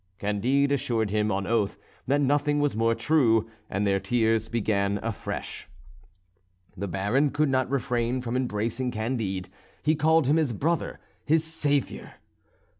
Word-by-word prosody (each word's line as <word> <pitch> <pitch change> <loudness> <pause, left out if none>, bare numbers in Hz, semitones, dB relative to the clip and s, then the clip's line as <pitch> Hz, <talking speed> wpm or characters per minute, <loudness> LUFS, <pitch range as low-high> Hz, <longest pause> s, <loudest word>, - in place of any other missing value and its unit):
Candide 120 +8 +1
assured 115 -6 0
him 105 0 +1
on 95 0 -1
oath 110 -3 0 0.3
that 140 +2 +2
nothing 145 +1 +2
was 145 -4 +1
more 115 +1 +2
true, 115 -9 +3 0.2
and 100 +2 -1
their 100 -1 +2
tears 110 +1 +1
began 100 -3 0
afresh. 115 -2 -5 1.1
The 100 +1 -4
Baron 105 - +1
could 150 +1 +1
not 130 -1 +1
refrain 125 -2 0
from 125 -1 -4
embracing 120 0 -1
Candide; 110 -6 -3 0.3
he 155 - +3
called 160 0 +3
him 145 +5 +3
his 150 -7 +1
brother, 160 +10 -1 0.2
his 160 +1 +2
saviour. 145 -4 -2
120 Hz, 140 wpm, -26 LUFS, 105-140 Hz, 1.1 s, true